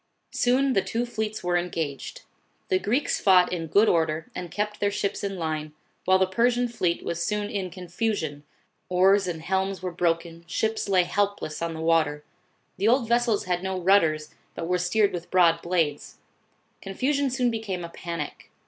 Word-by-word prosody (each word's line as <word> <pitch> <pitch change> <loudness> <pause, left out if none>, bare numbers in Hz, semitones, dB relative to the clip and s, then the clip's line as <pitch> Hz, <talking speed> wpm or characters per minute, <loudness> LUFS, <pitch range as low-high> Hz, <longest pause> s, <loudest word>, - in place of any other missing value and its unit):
Soon 260 +2 +2
the 195 - +3
two 225 +6 -2
fleets 220 -2 -4
were 175 0 0
engaged. 165 -5 -3 0.5
Tho 185 - +3
Greeks 245 +10 0
fought 185 -2 +5
in 165 -2 -3
good 205 +8 +4
order 160 -2 +1
and 180 -1 -6
kept 210 +2 -3
their 205 - +2
ships 200 0 -2
in 195 -1 -3
line, 155 -2 -3 0.3
while 190 0 +5
the 190 - +3
Persian 240 +5 +2
fleet 185 -8 -1
was 170 0 -2
soon 210 -1 -2
in 190 -3 -2
contusion, 175 -4 -3 0.5
oars 190 +2 +4
and 165 -3 -4
helms 190 +1 -1
were 180 - -2
broken, 170 -1 -1
ships 220 -2 -1
lay 185 -2 +4
helpless 200 -4 -2
on 165 -1 -2
the 160 - -6
water. 160 -2 +2 0.5
The 200 - +1
old 240 0 +3
vessels 235 -2 +2
had 180 -1 -1
no 190 0 -2
rudders, 165 -5 +2 0.2
but 165 - -4
were 180 0 +1
steered 200 +3 +2
with 175 -1 -5
broad 170 -2 +4
blades. 165 -5 -1 0.6
Confusion 275 +8 0
soon 250 -1 +1
became 205 -6 -4
a - - -8
panic. 170 -3 -6
185 Hz, 175 wpm, -26 LUFS, 170-210 Hz, 0.6 s, fought